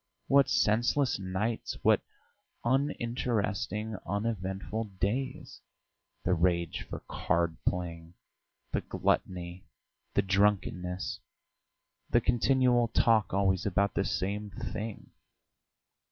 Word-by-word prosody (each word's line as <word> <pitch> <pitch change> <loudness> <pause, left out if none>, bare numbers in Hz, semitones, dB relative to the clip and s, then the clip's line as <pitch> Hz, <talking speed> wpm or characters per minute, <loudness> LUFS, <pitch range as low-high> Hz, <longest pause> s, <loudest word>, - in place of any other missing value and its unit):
What 140 0 +5
senseless 120 +4 +2
nights, 95 +5 -2
what - - +5 0.6
uninteresting, 115 -5 0
uneventful 100 +1 -2
days! 130 +7 -2 0.6
The 90 - +2
rage 85 -1 +1
for - - -5
card 85 -1 0
playing, 85 -1 -2 0.6
the - - 0
gluttony, 90 0 -1 0.5
the 100 - +4
drunkenness, 95 -2 +1 0.9
the - - +5
continual 125 -1 +3
talk 110 -3 +3
always 95 0 +2
about 100 +1 +1
the 100 - +1
same 100 +2 -2
thing. 105 +3 -6
100 Hz, 90 wpm, -30 LUFS, 90-115 Hz, 0.9 s, What